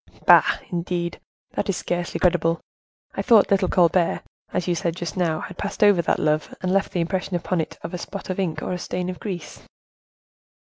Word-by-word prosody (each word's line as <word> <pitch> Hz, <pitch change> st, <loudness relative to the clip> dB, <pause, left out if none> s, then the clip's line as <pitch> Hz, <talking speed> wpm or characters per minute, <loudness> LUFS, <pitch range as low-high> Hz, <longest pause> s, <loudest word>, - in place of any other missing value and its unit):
"Bah! -, -, +7 dB
indeed? 175 Hz, 0 st, -2 dB, 0.3 s
That -, -, -3 dB
is 195 Hz, -, +1 dB
scarcely 175 Hz, 0 st, -2 dB
credible. 170 Hz, -2 st, +2 dB, 0.5 s
I -, -, -2 dB
thought 220 Hz, -5 st, +5 dB
little 195 Hz, -1 st, +3 dB
Colbert, 175 Hz, -1 st, +3 dB, 0.3 s
as 180 Hz, -1 st, -1 dB
you 175 Hz, -, +2 dB
said 170 Hz, 0 st, -1 dB
just 175 Hz, -3 st, -5 dB
now, 165 Hz, -4 st, 0 dB
had 185 Hz, -, -8 dB
passed 205 Hz, +1 st, -1 dB
over 205 Hz, -4 st, +6 dB
that -, -, +1 dB
love, 155 Hz, 0 st, 0 dB
and 185 Hz, 0 st, 0 dB
left 195 Hz, 0 st, +1 dB
the 175 Hz, -, 0 dB
impression 185 Hz, +2 st, -2 dB
upon 175 Hz, 0 st, 0 dB
it -, -, -6 dB
of 165 Hz, -, -6 dB
a 180 Hz, -, -3 dB
spot 200 Hz, 0 st, -6 dB
of 185 Hz, -, -4 dB
ink 175 Hz, -5 st, -1 dB
or -, -, -2 dB
a 180 Hz, -, -3 dB
stain 180 Hz, +1 st, -3 dB
of 180 Hz, -, -9 dB
grease." 185 Hz, -6 st, -6 dB
180 Hz, 200 wpm, -23 LUFS, 170-185 Hz, 0.5 s, Bah